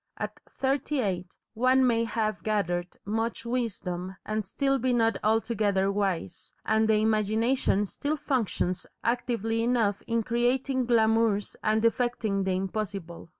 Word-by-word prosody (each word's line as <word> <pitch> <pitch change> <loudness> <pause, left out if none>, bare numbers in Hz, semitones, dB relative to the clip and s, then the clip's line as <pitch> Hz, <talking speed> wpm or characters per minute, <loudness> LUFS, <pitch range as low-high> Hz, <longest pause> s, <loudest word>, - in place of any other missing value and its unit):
At - - -5
thirty 275 +2 -1
eight 180 -6 -2 0.2
one 255 +3 +4
may 230 -2 +2
have 220 -1 -1
gathered 180 -5 -1
much 225 +3 -2
wisdom 190 -7 -3
and 215 0 -1
still 275 +6 +1
be 255 +1 +1
not 225 -1 +2
altogether 210 -3 +2
wise, 195 - -2
and 220 0 +3
the 220 - +5
imagination 215 +1 +2
still 290 +9 -3
functions 220 -10 -1 0.2
actively 230 -2 0
enough 230 -4 +1
in 230 -1 +1
creating 245 +2 +1
glamours 225 -3 +2
and 220 +1 +2
effecting 230 -4 +1
the 190 -1 +1
impossible. 190 -3 -4
220 Hz, 130 wpm, -28 LUFS, 200-240 Hz, 0.2 s, the